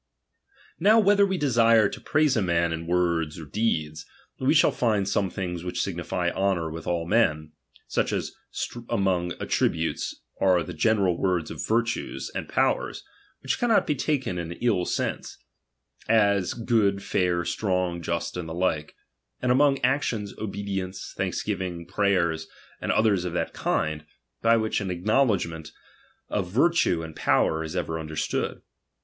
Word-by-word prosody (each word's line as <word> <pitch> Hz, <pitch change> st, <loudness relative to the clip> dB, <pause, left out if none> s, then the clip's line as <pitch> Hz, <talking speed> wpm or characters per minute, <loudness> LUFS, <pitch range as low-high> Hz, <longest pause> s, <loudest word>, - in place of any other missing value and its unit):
Now 210 Hz, +6 st, +5 dB
whether 200 Hz, -1 st, +5 dB
we 190 Hz, -1 st, -1 dB
desire 115 Hz, -, +4 dB
to -, -, -8 dB
praise 155 Hz, -2 st, +2 dB
a 110 Hz, -, +2 dB
man 85 Hz, -2 st, +1 dB
in 80 Hz, 0 st, -5 dB
Atd -, -, -6 dB
ter^ 85 Hz, -2 st, +2 dB
^ords 75 Hz, -, -11 dB
or 80 Hz, -, -8 dB
deeds, 75 Hz, -5 st, -1 dB, 0.4 s
we 135 Hz, +4 st, +2 dB
shall 155 Hz, -, +5 dB
find 105 Hz, -5 st, +1 dB
some 100 Hz, -1 st, +1 dB
things 90 Hz, -2 st, -4 dB
which 90 Hz, -, -5 dB
rai, 95 Hz, -, -2 dB
and -, -, -9 dB
sn -, -, -3 dB
signify 90 Hz, 0 st, -1 dB
honour 95 Hz, -4 st, 0 dB
with 80 Hz, 0 st, -7 dB
all 85 Hz, -1 st, 0 dB
men: 75 Hz, -6 st, +1 dB, 0.4 s
such -, -, 0 dB
as -, -, -2 dB, 0.6 s
among 95 Hz, -6 st, +1 dB
attri -, -, +1 dB
"'''"™^ -, -, -3 dB
butes, 80 Hz, 0 st, -3 dB, 0.2 s
are 90 Hz, -3 st, +3 dB
the 90 Hz, -, -7 dB
general 95 Hz, +1 st, +2 dB
words 90 Hz, -4 st, 0 dB
of -, -, -5 dB
virtues 110 Hz, -, -1 dB
and -, -, -5 dB
po -, -, +3 dB
wers, -, -, -7 dB, 0.4 s
which 135 Hz, -, -1 dB
cannot 235 Hz, -3 st, +3 dB
be -, -, +1 dB
taken 135 Hz, -, -1 dB
in 85 Hz, 0 st, -4 dB
ill 100 Hz, -4 st, 0 dB
sense; -, -, -3 dB, 0.7 s
as 100 Hz, -4 st, +3 dB
S*>od, 110 Hz, -4 st, +1 dB
fair, 90 Hz, -2 st, 0 dB
strong, 90 Hz, -4 st, -1 dB
just, 85 Hz, 0 st, -3 dB
and 90 Hz, -2 st, -5 dB
the 80 Hz, -, -5 dB
like: 85 Hz, -4 st, -1 dB, 0.4 s
and 125 Hz, -, +1 dB
among 140 Hz, +2 st, +4 dB
f^otions, 125 Hz, -6 st, 0 dB
obedience, 100 Hz, -3 st, -4 dB
thanksgiving, 90 Hz, -4 st, -3 dB
prayers, 85 Hz, -4 st, +1 dB, 0.3 s
and -, -, 0 dB
otliers 105 Hz, -5 st, +3 dB
of 90 Hz, -2 st, -4 dB
that -, -, -2 dB
kind, 75 Hz, 0 st, -1 dB, 0.4 s
by 115 Hz, 0 st, +4 dB
which 110 Hz, -1 st, 0 dB
an 95 Hz, -, -3 dB
acknowledgment 90 Hz, -, 0 dB, 0.6 s
of 95 Hz, -4 st, -2 dB
virtue 125 Hz, -, +2 dB
and 80 Hz, -1 st, -8 dB
power 80 Hz, 0 st, +2 dB
is 80 Hz, +2 st, -6 dB
ever 80 Hz, -3 st, -2 dB
understood. 80 Hz, -1 st, -3 dB
95 Hz, 165 wpm, -26 LUFS, 85-115 Hz, 0.7 s, Now